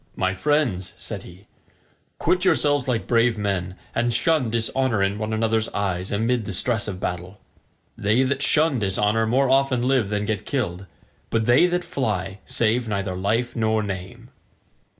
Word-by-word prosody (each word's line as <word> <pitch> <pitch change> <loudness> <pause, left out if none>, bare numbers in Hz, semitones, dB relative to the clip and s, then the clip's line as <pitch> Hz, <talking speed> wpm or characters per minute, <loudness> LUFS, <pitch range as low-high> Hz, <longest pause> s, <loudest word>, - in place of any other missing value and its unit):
"My 95 0 0
friends," 120 -5 0
said - - -6
he, 90 +3 -14 0.7
"quit 180 0 +1
yourselves 145 -7 +2
like 120 -3 0
brave 115 -1 +2
men, 95 -3 -2 0.2
and 120 +2 +1
shun 125 +2 +2
dishonour 115 -1 0
in 100 +2 -1
one 110 0 -3
another's 110 0 0
eyes 95 -2 -2
amid 115 +2 0
the 105 - -4
stress 110 +3 0
of 95 -3 -5
battle. 90 +1 -5 0.6
They 110 +6 +2
that 140 +1 -1
shun 150 -2 +3
dishonour 105 +2 +1
more 135 +4 +2
often 135 -2 +2
live 130 -7 +2
than 105 0 -1
get 105 -1 -2
killed, 95 -8 -3 0.4
but 110 -1 0
they 125 +9 +5
that 175 0 -1
fly 100 -7 -2
save 120 -2 +1
neither 100 -3 -2
life 110 +6 -1
nor 110 -1 +1
name." 95 -2 -7
110 Hz, 160 wpm, -23 LUFS, 100-130 Hz, 0.7 s, they